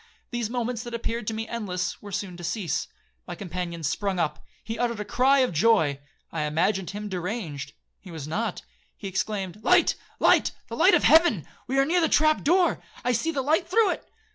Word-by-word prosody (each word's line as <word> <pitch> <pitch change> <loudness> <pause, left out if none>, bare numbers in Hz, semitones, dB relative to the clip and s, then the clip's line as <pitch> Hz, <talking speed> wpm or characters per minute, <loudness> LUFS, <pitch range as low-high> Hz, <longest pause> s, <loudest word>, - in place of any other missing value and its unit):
These 240 -3 -2
moments 240 -1 -2
that 240 0 -6
appeared 230 -1 -3
to 225 - -1
me 225 +1 -4
endless, 185 -6 -3
were 205 - -9
soon 185 -1 -4
to 175 - -9
cease. 185 0 -2 0.4
My - - -5
companion 175 -3 -5
sprung 190 +5 -1
up,—he 175 +7 -4
uttered 235 -3 0
a 210 - -3
cry 270 +4 +3
of 255 -7 +1
joy. 160 -6 +3 0.3
I 160 - -2
imagined 180 +5 0
him 210 +1 -5
deranged,—he 180 - -6
was 160 -4 -7
not. 205 +5 -2 0.3
He 200 - -6
exclaimed, 195 +1 -3
'Light, - - +5 0.3
light,—the - - +2
light - - +6
of - - +2
heaven; 320 - +5 0.2
we 265 +2 -1
are 275 - +5
near 350 +4 +2
the 320 - +2
trap 310 0 +3
door, 350 +4 +3 0.2
I 250 - +2
see 285 +8 0
the 275 -4 -2
light 315 +5 +2
through 415 0 +4
it.' - - -6
215 Hz, 190 wpm, -26 LUFS, 180-250 Hz, 0.4 s, light